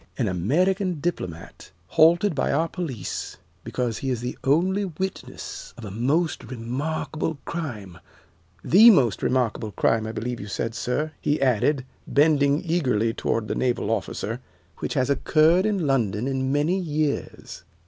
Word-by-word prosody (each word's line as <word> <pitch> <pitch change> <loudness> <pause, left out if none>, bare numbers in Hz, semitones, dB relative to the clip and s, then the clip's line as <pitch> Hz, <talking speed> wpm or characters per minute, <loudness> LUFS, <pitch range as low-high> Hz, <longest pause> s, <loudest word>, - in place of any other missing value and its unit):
"An 120 - 0
American 175 - +1
diplomat 95 - -5 0.2
halted 170 +4 +4
by 140 - 0
our 160 +3 +1
police 150 - -5 0.3
because 120 -3 -2
he 135 - -3
is 125 -3 -1
the 125 +1 -4
only 185 +8 +2
witness 190 +2 -6
of 115 - -8
a 100 - -7
most 140 - 0
remarkable 145 +6 -3
crime 105 - -5 0.6
the 220 +6 +8
most 125 - +4
remarkable 120 -4 0
crime, 110 -1 +1
I - - -3
believe 115 +2 -4
you 100 - -7
said, 115 +3 -3
sir," 125 +6 -2
he 145 +1 +1
added, 130 +2 +2 0.2
bending 145 +1 +3
eagerly 125 -10 +1
toward 115 -1 -1
the - - -1
naval 120 -4 0
officer, 115 +2 -3 0.4
"which - - -3
has 130 +2 +1
occurred 160 +7 +3
in 200 -6 0
London 120 -4 0
in 130 -1 -1
many 150 +7 +1
years." 155 -4 -3
135 Hz, 145 wpm, -24 LUFS, 115-160 Hz, 0.6 s, the